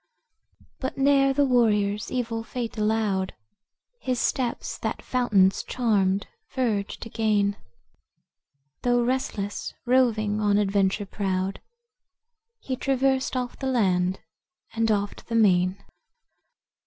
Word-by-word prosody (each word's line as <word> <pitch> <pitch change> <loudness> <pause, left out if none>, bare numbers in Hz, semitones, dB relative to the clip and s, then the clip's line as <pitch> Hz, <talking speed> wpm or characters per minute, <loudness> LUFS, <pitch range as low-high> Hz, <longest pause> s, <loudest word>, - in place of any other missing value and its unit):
'But 260 0 -4
ne'er 275 0 +4
the 285 +1 +3
warrior's 210 -5 +2
evil 230 -3 -2
fate 235 0 -5
allowed 210 -3 0 0.6
His 255 -2 -1
steps 245 -3 -1
that - - -3
fountain's 200 -7 +2
charmed 200 -5 +1 0.3
verge 220 -6 -1
to 230 - -6
gain. 210 -3 +1 1.3
Though 245 -1 +2
restless, 240 -5 -2
roving 225 -5 +2
on 205 -1 +3
adventure 200 0 +1
proud, 190 -1 -2 1.0
He 265 - -4
traversed 265 0 0
oft 250 -1 -4
the 265 - -2
land 190 -7 +1 0.5
and 225 0 +1
oft 205 -1 -1
the 230 - -3
main." 185 -4 +3
220 Hz, 105 wpm, -25 LUFS, 200-250 Hz, 1.3 s, ne'er